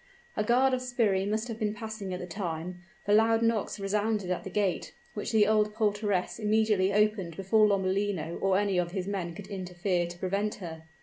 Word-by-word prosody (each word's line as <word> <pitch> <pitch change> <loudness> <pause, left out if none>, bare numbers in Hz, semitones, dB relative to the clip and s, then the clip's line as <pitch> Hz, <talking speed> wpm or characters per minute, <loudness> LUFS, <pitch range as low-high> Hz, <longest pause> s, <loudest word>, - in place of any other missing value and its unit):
A 215 - +1
guard 255 +4 +3
of 255 - 0
sbirri 225 -6 +1
must 215 +3 -1
have 225 -2 -6
been 210 -1 -1
passing 220 -3 -6
at 180 - -3
the 180 - -5
time, 175 -1 -5 0.2
for 205 - +2
loud 225 +1 +4
knocks 230 -2 0
resounded 205 -1 0
at 180 - -2
the - - -6
gate, 195 -2 -1 0.2
which 210 - -4
the 215 -2 +5
old 210 0 +2
portress 205 -3 0
immediately 210 -3 +2
opened 205 -5 +1
before 210 +3 +4
Lomellino 190 -3 0
or 195 -1 +3
any 200 -2 +1
of 175 0 -2
his 190 -2 -2
men 180 -4 -3
could 205 - -8
interfere 180 -2 -2
to 175 0 -9
prevent 200 +4 -1
her. 160 -4 -8
205 Hz, 195 wpm, -29 LUFS, 185-215 Hz, 0.2 s, the